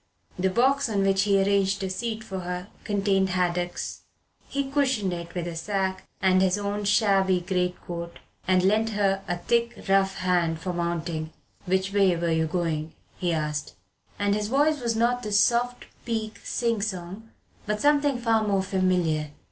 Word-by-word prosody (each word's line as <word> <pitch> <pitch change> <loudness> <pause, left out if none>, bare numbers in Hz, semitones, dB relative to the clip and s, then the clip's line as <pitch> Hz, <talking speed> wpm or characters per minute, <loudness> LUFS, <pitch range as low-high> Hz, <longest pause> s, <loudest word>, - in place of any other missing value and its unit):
The 190 +1 +2
box 265 +6 +2
on 200 -2 +1
which 195 0 +3
he 200 -1 +3
arranged 195 0 +2
a 190 - -2
seat 220 +3 -3
for 190 -3 -5
her 180 +2 -5 0.2
contained 195 -2 +1
haddocks. 180 -1 -2 0.5
He 280 0 -2
cushioned 260 -10 +1
it 170 0 -7
with 175 -1 -2
a 170 -1 -5
sack 190 +2 -2
and 185 0 +4
his 190 +1 +3
own 205 0 -3
shabby 195 -3 +3
greatcoat, 175 -1 -3 0.3
and 185 0 +3
lent 215 +4 +3
her 195 -1 +2
a 175 -2 -1
thick 235 +5 0
rough 195 0 +3
hand 175 -3 +1
for 180 - -5
the 175 - -2
mounting. 170 -2 -2 0.4
"Which 190 +1 0
way 195 -3 +4
were 170 0 -1
you 160 0 +1
going?" 160 -2 -2 0.2
he 180 -2 0
asked, 150 -2 -2 0.4
and 205 0 +1
his 210 0 -1
voice 290 +4 +2
was 235 -2 0
not 240 +2 +2
the 210 -3 -5
soft 240 +4 +2 0.2
Peak 220 -2 -3
sing 230 -3 0
song 195 +2 -5 0.4
but 210 0 -1
something 290 +1 +3
far 230 -2 +2
more 200 -2 +1
familiar. 180 -5 +1
195 Hz, 170 wpm, -26 LUFS, 180-220 Hz, 0.5 s, and